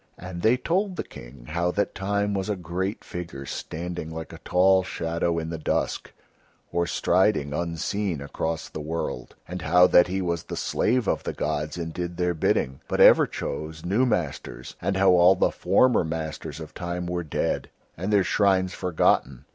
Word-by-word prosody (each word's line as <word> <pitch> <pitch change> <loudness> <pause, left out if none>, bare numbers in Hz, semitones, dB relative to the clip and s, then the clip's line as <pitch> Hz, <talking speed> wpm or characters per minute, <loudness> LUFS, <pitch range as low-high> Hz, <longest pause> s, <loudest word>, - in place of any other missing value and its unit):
And 90 -1 -7
they 115 +5 +4
told 185 +8 0
the - - -3
King - - -12
how 85 +3 0
that 100 - 0
Time 100 +1 -1
was 95 0 -2
a 105 - +1
great 90 +3 -3
figure 85 -6 -7
standing 85 +3 -5
like 80 0 -7
a - - -10
tall 95 +1 +4
shadow 85 -1 -2
in 80 0 -3
the 80 - -4
dusk - - -1 0.6
or 85 0 0
striding, 90 -7 +2
unseen, 85 +2 -2
across 80 +3 -3
the - - -7
world, 80 +2 -4
and 90 0 -5
how 90 +1 +5
that 90 -1 +6
he 95 +2 -2
was 85 -3 -2
the - - -6
slave 120 -1 +1
of - - +1
the - - -4
gods 75 +3 -2
and 80 -1 -4
did 85 0 -4
Their 90 0 +1
bidding, 65 -4 0
but - - -2
ever - - +8
chose 80 +1 -5
new 110 +8 +2
masters, 85 - -3
and 95 -1 0
how 95 -1 +5
all 90 +1 +6
the - - +2
former 130 -6 +3
masters 80 -2 -5
of 80 -1 -9
Time 90 0 -4
were 90 0 -2
dead 75 - -2 0.3
and 95 +5 -3
Their 100 -2 +4
shrines 95 -1 +2
forgotten. 70 -6 +1
90 Hz, 180 wpm, -25 LUFS, 80-95 Hz, 0.6 s, ever